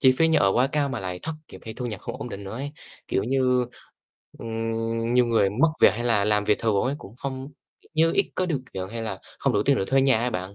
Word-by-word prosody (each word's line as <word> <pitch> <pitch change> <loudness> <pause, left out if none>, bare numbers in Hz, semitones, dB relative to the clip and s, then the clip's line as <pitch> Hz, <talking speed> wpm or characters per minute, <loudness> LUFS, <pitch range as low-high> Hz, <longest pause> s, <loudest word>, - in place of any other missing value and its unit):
chi 130 -2 +6
phí 165 0 +5
nhà 160 - +4
ở 95 -1 +4
quá 125 +2 +3
cao, 145 -2 +1
mà 120 -5 -3
lại 90 -1 -4
thất 160 - -3 0.2
nghiệp, 95 - -10
hay 110 -1 -6
thu 125 0 -4
nhập 110 -5 -5
không - - -6
ổn 125 - -6
định 100 -2 -7
nữa 95 - -7
ấy. 140 +4 -5 0.4
Kiểu - - +1
như, 125 -1 +2 0.7
ừm, 115 +1 -2
nhiều 125 -1 +5
người 110 -4 +3
mất 130 +11 +3
việc, - - +8
hay 120 - -3
là 110 -4 +3
làm 105 -1 +2
việc 105 - +2
thường 110 -4 +1
ấy 135 +3 0
cũng 110 +5 -12
không 130 0 -5 0.3
kiểu - - -26
như, 165 +1 +4
ít 200 - +1
có 185 - 0
điều 150 -7 -1
kiện, 95 0 -4
hay 115 0 -4
là 105 -4 -4 0.2
không - - +1
đủ 100 - +2
tiền 140 +4 +3
để - - 0
thuê 135 0 +3
nhà 135 -4 +4
ấy 125 +1 0
bạn, 95 +1 -4
115 Hz, 280 wpm, -25 LUFS, 105-135 Hz, 0.7 s, việc